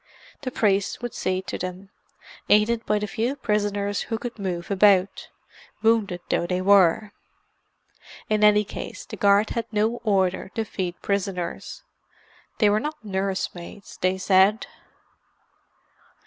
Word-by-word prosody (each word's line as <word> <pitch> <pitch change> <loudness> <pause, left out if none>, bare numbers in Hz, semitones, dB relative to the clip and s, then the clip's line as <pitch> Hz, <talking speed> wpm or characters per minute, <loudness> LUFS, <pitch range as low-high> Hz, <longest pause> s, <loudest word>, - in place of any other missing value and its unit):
The 270 - -3
priest 205 -2 0
would 240 - -4
see 185 0 -2
to - - -5
them, 185 +2 -6 0.6
aided 225 +2 +3
by 210 - +2
the 210 - -2
few 225 +7 -2
prisoners 205 -5 -1
who 225 - -1
could 240 -1 -7
move 180 -2 -4
about, 195 -1 +3 0.5
wounded 215 -6 +2
though 170 - +1
they 180 0 -1
were. 195 +1 +4 1.2
In 215 -1 +1
any 210 0 +6
case - - -8
the - - -8
guard 200 +1 +3
had 230 -1 -3
no 220 +2 +1
order 190 -3 +1
to 225 - -1
feed 180 -4 -4
prisoners; 195 - -3 0.7
they 215 - +4
were 205 +1 +3
not 300 -2 -6
nurse 190 -1 -2
maids, 175 +3 -11
they 185 +1 +1
said. 195 +6 +3
205 Hz, 135 wpm, -24 LUFS, 190-215 Hz, 1.2 s, any